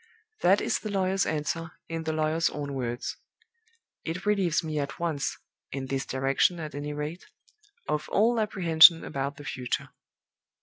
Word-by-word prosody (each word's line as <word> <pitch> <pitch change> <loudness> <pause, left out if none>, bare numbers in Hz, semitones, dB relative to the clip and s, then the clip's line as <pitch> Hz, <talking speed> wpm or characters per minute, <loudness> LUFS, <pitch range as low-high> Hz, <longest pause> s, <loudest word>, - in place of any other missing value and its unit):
That 195 +3 +4
is - - 0
the 215 - -5
lawyer's 195 -1 +1
answer 160 +1 -2
in 165 0 -4
the 160 - 0
lawyer's 155 +1 +1
own 145 -1 -5
words. 120 -2 -3 0.9
It 170 +4 -4
relieves 195 -6 +2
me 155 -2 -2
at 140 -1 -4
once 160 -5 -2 0.3
in 135 -1 -4
this 135 0 -3
direction, 135 +6 +1
at 155 -2 -6
any 145 +1 -4
rate 150 +4 -5 0.6
of 150 - -2
all 230 +3 +3
apprehension 170 -6 +6
about 140 0 -3
the 145 - -10
future. 125 -3 -3
155 Hz, 155 wpm, -28 LUFS, 140-175 Hz, 0.9 s, apprehension